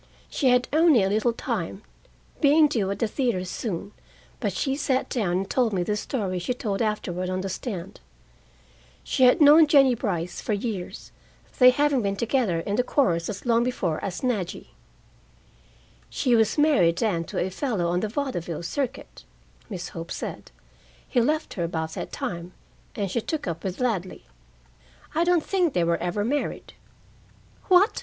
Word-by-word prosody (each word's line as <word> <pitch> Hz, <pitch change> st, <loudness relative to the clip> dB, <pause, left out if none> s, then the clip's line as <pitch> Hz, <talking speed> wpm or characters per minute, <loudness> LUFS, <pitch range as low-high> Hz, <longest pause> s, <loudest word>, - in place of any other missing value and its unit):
She 270 Hz, -, +2 dB
had 250 Hz, 0 st, +3 dB
only 310 Hz, -, +5 dB
a 190 Hz, -, +1 dB
little 215 Hz, +4 st, +2 dB
time, 230 Hz, -, -4 dB, 0.6 s
being 300 Hz, +1 st, +5 dB
due 220 Hz, -9 st, -1 dB
at 200 Hz, -, -2 dB
the 230 Hz, -, 0 dB
theater 220 Hz, -6 st, -1 dB
soon, 200 Hz, 0 st, -4 dB, 0.5 s
but -, -, -1 dB
she 270 Hz, -2 st, -1 dB
sat 270 Hz, -2 st, 0 dB
down 210 Hz, -8 st, 0 dB
and 190 Hz, +2 st, -1 dB
told 240 Hz, -2 st, +1 dB
me 180 Hz, -2 st, 0 dB
the 210 Hz, +4 st, -1 dB
story 205 Hz, -4 st, -2 dB
she 245 Hz, +8 st, -2 dB
told 210 Hz, -4 st, -2 dB
afterward 185 Hz, -5 st, -2 dB
on 185 Hz, 0 st, -2 dB
the 195 Hz, -, -4 dB
stand: 190 Hz, -3 st, -6 dB, 1.0 s
She 260 Hz, -, +2 dB
had 250 Hz, -, +5 dB
known 305 Hz, +1 st, +8 dB
Jennie 275 Hz, -3 st, +5 dB
Brice 180 Hz, -7 st, -3 dB
for 215 Hz, -, -2 dB
years, 205 Hz, -3 st, -5 dB, 0.5 s
they 250 Hz, -1 st, +9 dB
having 285 Hz, 0 st, +2 dB
been 200 Hz, -2 st, -1 dB
together 225 Hz, -6 st, 0 dB
in 200 Hz, +4 st, -2 dB
the 250 Hz, -, +3 dB
chorus 175 Hz, -, +1 dB
as 205 Hz, +2 st, -6 dB
long 235 Hz, -1 st, +3 dB
before 190 Hz, -10 st, -2 dB
as 185 Hz, -2 st, -4 dB
Nadjy. 215 Hz, -9 st, -2 dB, 1.4 s
"She 245 Hz, -2 st, +1 dB
was 220 Hz, +2 st, +2 dB
married 235 Hz, -, +4 dB
then 185 Hz, -7 st, 0 dB
to -, -, -7 dB
a 185 Hz, -, -1 dB
fellow 210 Hz, -4 st, -1 dB
on 175 Hz, +1 st, +1 dB
the 215 Hz, -, -2 dB
vaudeville 190 Hz, -, -3 dB
circuit," 255 Hz, +9 st, -4 dB, 0.5 s
Miss 180 Hz, -4 st, -5 dB
Hope 165 Hz, 0 st, -8 dB
said. -, -, -6 dB, 0.6 s
"He 245 Hz, -, +2 dB
left 305 Hz, +6 st, 0 dB
her 175 Hz, -, -3 dB
about 160 Hz, -1 st, -3 dB
that -, -, -6 dB
time, 170 Hz, +1 st, -5 dB, 0.4 s
and 200 Hz, -3 st, -2 dB
she 235 Hz, -, 0 dB
took 315 Hz, +6 st, -3 dB
up 165 Hz, -1 st, -4 dB
with 190 Hz, -1 st, -4 dB
Ladley. 210 Hz, -8 st, -2 dB, 0.9 s
I 330 Hz, -, +2 dB
don't 345 Hz, -2 st, +2 dB
think 360 Hz, -6 st, +1 dB
they 175 Hz, -, +2 dB
were 170 Hz, 0 st, +1 dB
ever 180 Hz, +4 st, -2 dB
married." 285 Hz, +5 st, -3 dB, 0.9 s
"What!" 370 Hz, +3 st, +4 dB
215 Hz, 170 wpm, -25 LUFS, 180-260 Hz, 1.4 s, they